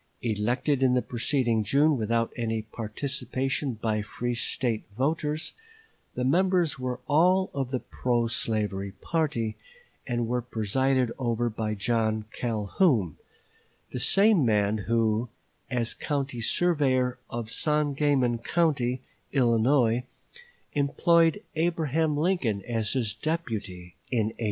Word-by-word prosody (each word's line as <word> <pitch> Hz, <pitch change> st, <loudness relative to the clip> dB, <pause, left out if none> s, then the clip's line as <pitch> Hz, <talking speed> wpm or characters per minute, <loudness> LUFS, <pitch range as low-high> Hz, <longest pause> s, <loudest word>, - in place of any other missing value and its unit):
Elected 120 Hz, +5 st, 0 dB
in 130 Hz, -1 st, +4 dB
the 125 Hz, -, +3 dB
preceding 120 Hz, -2 st, 0 dB
June 145 Hz, +8 st, +3 dB
without 115 Hz, 0 st, 0 dB
any 115 Hz, -2 st, -2 dB
participation 130 Hz, +5 st, -3 dB
by 110 Hz, -1 st, -1 dB
free 120 Hz, +3 st, -3 dB
State 115 Hz, -1 st, 0 dB
voters, 150 Hz, +3 st, -1 dB, 0.6 s
the 125 Hz, -, -1 dB
members 175 Hz, 0 st, +2 dB
were 125 Hz, -1 st, -3 dB
all 180 Hz, +6 st, +3 dB
of 135 Hz, -3 st, -2 dB
the 130 Hz, -1 st, -1 dB
pro 120 Hz, -2 st, 0 dB
slavery 105 Hz, -4 st, -1 dB
party, 130 Hz, -, -1 dB, 0.5 s
and 120 Hz, -2 st, -1 dB
were 125 Hz, +1 st, 0 dB
presided 125 Hz, +2 st, 0 dB
over 120 Hz, -1 st, 0 dB
by 110 Hz, -1 st, -2 dB
John 110 Hz, 0 st, 0 dB
Calhoun, 110 Hz, -, +1 dB, 0.8 s
the 125 Hz, -, -2 dB
same 195 Hz, -, +4 dB
man 105 Hz, -2 st, +2 dB
who, 115 Hz, 0 st, +1 dB, 0.4 s
as 120 Hz, -3 st, -1 dB
county 140 Hz, -5 st, -3 dB
surveyor 130 Hz, -4 st, +2 dB
of 115 Hz, -1 st, -5 dB
Sangamon 145 Hz, -4 st, +1 dB
County, 130 Hz, -3 st, 0 dB, 0.3 s
Illinois, 120 Hz, -1 st, +3 dB, 0.7 s
employed 165 Hz, +6 st, +3 dB
Abraham 160 Hz, -2 st, +1 dB
Lincoln 145 Hz, -, 0 dB
as 115 Hz, -3 st, -1 dB
his 115 Hz, -6 st, 0 dB
deputy 110 Hz, -, -4 dB, 0.2 s
in 110 Hz, -4 st, +1 dB
1832. 110 Hz, -, -14 dB
125 Hz, 115 wpm, -27 LUFS, 115-145 Hz, 0.8 s, in